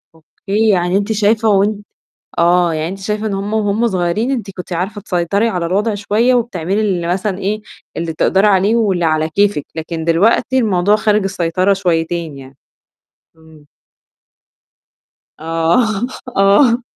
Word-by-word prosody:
أوكي، 200 +7 -2
يعني 180 -1 +2
أنتِ 205 +2 -2
شايفة 220 +1 +2
وأنتِ 205 +1 +1 0.6
آه، 175 0 +3
يعني 155 +1 -2
أنتِ 190 +2 -7
شايفة 210 +2 -3
إن 205 - -2
هم 200 +2 -4
وهم 215 +1 +1
صغيّرين 190 +5 -1
أنت 235 -7 -3
كنتِ 180 0 -7
عارفة 190 +5 -3
تسيطري 200 +3 0
على 180 -5 -2
الوضع 205 +5 0
شوية 220 +5 +1
وبتعملي 200 -5 -1
ال 185 -5 -1
مثلًا 190 +2 -1
إيه، 210 +2 -2 0.3
اللي 165 0 -3
بتقدري 190 +5 +2
عليه 200 +2 +3
واللي 195 -6 +1
على 155 -1 +1
كيفِك 200 -3 +1
لكن 160 0 -5
دلوقتي 205 +10 +2
الموضوع 205 -3 +2
خارج 215 -1 +1
السيطرة 185 0 0
شويتين 170 -5 -2
يعني. 135 0 -13 0.8
إمم. 160 -2 -19 1.7
آه، 195 +8 0 0.3
آه. 230 +5 +4
195 Hz, 140 wpm, -16 LUFS, 170-215 Hz, 1.7 s, آه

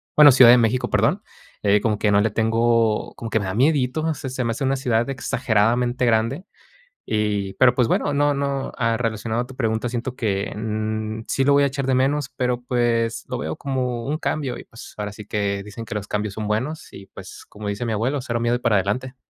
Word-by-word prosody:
bueno, 150 -2 +9
Ciudad 125 -2 +8
de 125 - +7
México, 120 +2 0
perdón, - - +1 0.4
eh, 100 0 +3
como 110 -2 0
que 105 0 +1
no 100 - +4
le 110 - +2
tengo, 115 0 +1
como 115 -1 -7
que 110 - +2
me 100 - -3
da 95 - -3
miedito. 150 +3 +1
Se 145 -3 -6
se 130 0 -3
me 115 - 0
hace 115 - -4
una 135 0 +1
ciudad 120 -2 0
exageradamente 125 -2 +1
grande, 115 +8 +1 0.6
y 105 -2 -1
pero, 125 -2 +4
pues 125 -3 +2
bueno, 145 - +1
no 145 +1 +2
no. 140 -1 -2
Ah, 115 -2 +1
relacionado 115 0 -2
a 120 - -6
tu 130 0 -13
pregunta, 110 -1 -1
siento 120 +1 -4
que, 100 -4 -2
mm, 110 0 -3
sí 135 - 0
lo 140 - +3
voy 140 0 +5
a - - +4
echar 135 0 -3
de 130 -1 +2
menos, 135 +2 +1
pero 125 -1 -2
pues, 120 -2 0
lo - - -4
veo 80 +1 -4
como 125 -4 -2
un 150 +2 -1
cambio, 140 -7 -2
y - - -10
pues, 115 - -13
ahora 105 -1 -4
sí 105 0 -10
que 100 -1 -2
dicen 105 +2 -8
que 110 - -7
los 105 -1 -4
cambios 105 -1 -3
son 110 -1 -4
buenos, 125 +9 -3
y 95 - -11
pues, - - -11
como 105 0 -8
dice 100 +3 -3
mi 115 - -2
abuelo: 130 +6 -1
"Cero 115 -1 -2
miedo, 120 +1 +1
y - - -3
para 115 -4 +2
adelante". 125 +7 -2
115 Hz, 230 wpm, -22 LUFS, 110-130 Hz, 0.6 s, bueno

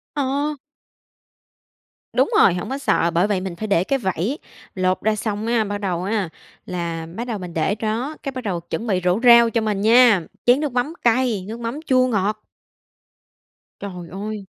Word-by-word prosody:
Ờ. 285 +2 -1 1.6
Đúng - - +2
rồi, 185 - +6
hổng 180 +4 -4
có 270 - -2
sợ, 170 -11 +1
bởi 175 +4 +2
vậy 200 -3 0
mình 185 -2 -5
phải 215 +4 -5
để 180 -4 +2
cái 270 +7 0
vẩy, 190 - -2 0.4
lột 185 0 0
ra 220 0 +1
xong 210 0 -3
á, 230 -1 +2
bắt 205 -1 -3
đầu 185 -4 -2
á, 200 -2 -1 0.4
là 170 -2 -4
bắt 235 +4 -4
đầu 225 -4 -2
mình 180 -2 -8
để 165 +5 0
đó, 225 +7 -3
cái 275 - -3
bắt 255 -2 -6
đầu 185 -5 -2
chuẩn 220 +7 -5
bị 185 -3 +1
rổ 180 +3 +2
rau 235 -1 +8
cho 230 0 0
mình 210 -2 -1
nha, 230 -2 +6 0.2
chén 245 +3 +5
nước 300 -2 -2
mắm 255 +6 -1
cay, 235 -5 +2
nước 225 +2 -6
mắm 235 +5 -4
chua 255 -1 +4
ngọt. 215 -2 -1 1.4
Trời 180 -4 -7
ơi! 205 +1 -5
215 Hz, 190 wpm, -21 LUFS, 185-245 Hz, 1.6 s, rau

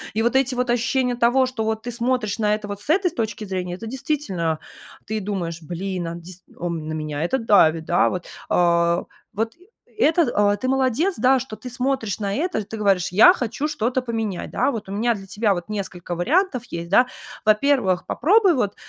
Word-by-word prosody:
И 225 - +1
вот 240 +3 +1
эти 265 -1 +2
вот 250 0 -1
ощущения 250 +1 +1
того, 245 +2 +3
что, 255 -3 -3
вот, 220 0 -2
ты 245 - -4
смотришь 235 -3 -1
на 210 -1 +2
это, 210 -1 -7
вот, 205 0 -6
с - - -11
этой 360 +2 +3
точки 225 -6 -3
зрения- 180 -2 -3
это, 220 - -9
действительно, 225 - -2 0.5
ты 220 0 -2
думаешь, 180 -5 -4
блин, 180 +2 -4
а, 165 - -4
дис 175 +1 -11
у, 175 - -3
на 160 -2 -4
меня 155 -1 -3
это 175 +10 +1
давит, 165 -9 +4
да, 175 - +3
вот. 180 -1 -4 0.2
А, 170 0 +3 0.3
вот, 225 +2 -2 0.4
это, 335 -4 +4
а, 205 0 +3
ты 255 - -3
молодец, 265 - +1
да, 260 +1 +4
что 250 -3 -7
ты 250 - -9
смотришь 250 -4 -2
на 200 -2 -2
это, 315 - -1
ты 220 +2 -7
говоришь: 195 -3 +2
"Я 215 - +8
хочу 265 - -2
что-то 260 -3 -1
поменять". 225 -6 -3
Да? - - +1
Вот 215 -5 -6
у - - -6
меня 230 +4 +1
для 195 -3 -9
тебя 205 +1 +1
вот 175 +1 -6
несколько 185 -4 -4
вариантов 275 - +1
есть, 170 -5 -6
да. 245 +7 +5 0.4
Во-первых, 215 -4 +2
попробуй 385 0 +4
вот 205 -6 -1
215 Hz, 200 wpm, -22 LUFS, 185-255 Hz, 0.5 s, Я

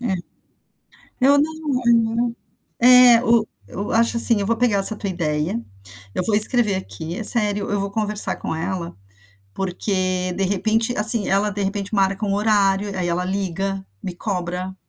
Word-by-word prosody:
É. 230 -6 -3 1.1
Eu 280 +3 +3
não 310 +2 -2 0.3
eu 235 - +4
não 230 +1 -1 0.5
Eh, 250 -1 +6
o, 230 -2 +1 0.2
eu 200 - -7
acho 230 +1 +1
assim, 230 -1 +6
eu 200 - -3
vou 230 +2 -1
pegar 225 -4 0
essa 195 +3 +6
tua 200 -1 -5
ideia, 150 -7 -3 0.5
eu - - -2
vou 215 - -1
escrever 215 -1 +6
aqui, 170 -2 -7
é 220 - -4
sério, 205 -3 +5
eu 205 -1 -2
vou 200 0 -4
conversar 210 0 0
com - - -6
ela, 170 +1 -6 0.6
porque 185 -1 -3
de 195 - -3
repente 220 +5 -2
assim 215 0 +3
ela 200 +2 0
de 205 0 -6
repente 200 +1 -5
marca 195 0 -1
um 200 - -2
horário 205 -1 0
e 200 - -8
aí 180 -2 -3
ela 175 +1 -2
liga, 195 +1 -4 0.2
me 180 - -7
cobra. 180 -1 -5
200 Hz, 175 wpm, -19 LUFS, 190-225 Hz, 1.1 s, Eh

